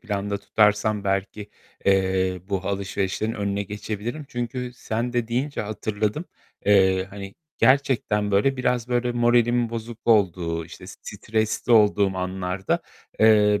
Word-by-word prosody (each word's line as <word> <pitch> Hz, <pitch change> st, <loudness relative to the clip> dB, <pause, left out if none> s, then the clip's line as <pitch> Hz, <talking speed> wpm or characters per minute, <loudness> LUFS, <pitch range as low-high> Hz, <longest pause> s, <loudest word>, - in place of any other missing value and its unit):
planda 100 Hz, -2 st, -3 dB
tutarsam, 105 Hz, 0 st, +2 dB
belki, 100 Hz, +2 st, -2 dB, 0.3 s
eee, 95 Hz, -1 st, +2 dB
bu 100 Hz, -2 st, -1 dB
alışverişlerin 100 Hz, +2 st, -2 dB
önüne 100 Hz, -2 st, -2 dB
geçebilirim. 105 Hz, +7 st, -5 dB
Çünkü 125 Hz, +1 st, -4 dB
sen 115 Hz, +1 st, -3 dB
de 120 Hz, -2 st, -1 dB
deyince 130 Hz, +5 st, -2 dB
hatırladım. 105 Hz, -, -2 dB, 0.4 s
Eee, 95 Hz, -2 st, +4 dB
hani, 100 Hz, -1 st, -8 dB, 0.2 s
gerçekten, 130 Hz, -6 st, +2 dB
böyle, 105 Hz, +8 st, +2 dB
biraz 125 Hz, -1 st, 0 dB
böyle 120 Hz, 0 st, 0 dB
moralimin 120 Hz, 0 st, +2 dB
bozuk 115 Hz, 0 st, -6 dB
olduğu, 90 Hz, -7 st, +2 dB
işte, -, -, -12 dB
stresli 110 Hz, +1 st, -2 dB
olduğum 105 Hz, -3 st, +4 dB
anlarda, 95 Hz, 0 st, -2 dB, 0.4 s
eee, 105 Hz, -2 st, +5 dB
105 Hz, 120 wpm, -24 LUFS, 100-120 Hz, 0.4 s, eee